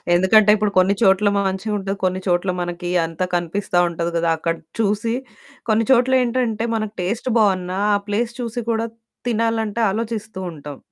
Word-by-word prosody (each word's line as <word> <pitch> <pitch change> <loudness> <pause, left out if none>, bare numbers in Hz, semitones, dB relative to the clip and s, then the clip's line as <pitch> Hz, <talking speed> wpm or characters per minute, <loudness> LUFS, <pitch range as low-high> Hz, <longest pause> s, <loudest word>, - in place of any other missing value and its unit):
ఎందుకంటే 205 +4 +5
ఇప్పుడు 210 -1 0
కొన్ని 185 +2 +4
చోట్ల 195 +2 +4
మ - - +2
మంచిగా 190 +3 -3
ఉంటది, 195 0 -3
కొన్ని 185 0 0
చోట్ల 180 +1 +1
మనకి 175 0 -4
అంతా 165 +2 -3
కనిపిస్తా 175 +2 -1
ఉంటది 170 0 -3
కదా! 165 0 +1
అక్కడ 165 +1 -1 0.2
చూసి 215 +1 0 0.6
కొన్ని 220 +1 +3
చోట్ల 260 +1 +4
ఏంటంటే, 235 -2 0
మనకు 215 -1 -3
టేస్ట్ 220 +8 -2
బావున్నా, 185 -3 +1 0.2
ఆ - - +4
ప్లేస్ 230 +3 -1
చూసి 240 0 -3
కూడా 225 0 0 0.4
తినాలంటే 225 -1 0
ఆలోచిస్తూ 220 -2 -4
ఉంటాం. 145 -3 -9
205 Hz, 160 wpm, -21 LUFS, 180-225 Hz, 0.6 s, ఎందుకంటే